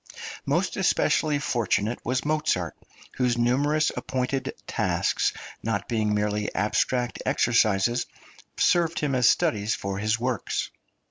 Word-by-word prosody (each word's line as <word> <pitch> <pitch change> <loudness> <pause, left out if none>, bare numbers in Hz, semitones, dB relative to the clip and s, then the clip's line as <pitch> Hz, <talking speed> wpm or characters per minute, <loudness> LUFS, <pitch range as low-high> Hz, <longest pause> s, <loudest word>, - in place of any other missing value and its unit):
Most - - 0
especially 150 -2 +2
fortunate 120 -4 -1
was 130 +3 -1
Mozart, 150 - 0 0.4
whose 125 -2 +1
numerous 145 +6 +2
appointed 130 +1 -2
tasks, - - 0 0.3
not 110 -3 -2
being 110 -3 0
merely 105 0 -1
abstract 120 +4 0
exercises, 115 0 +2 0.5
served 170 -1 +2
him 145 -2 -1
as 125 -2 +5
studies 105 0 +1
for 100 0 -4
his 110 +2 0
works. 125 -3 -2
120 Hz, 115 wpm, -26 LUFS, 105-130 Hz, 0.5 s, as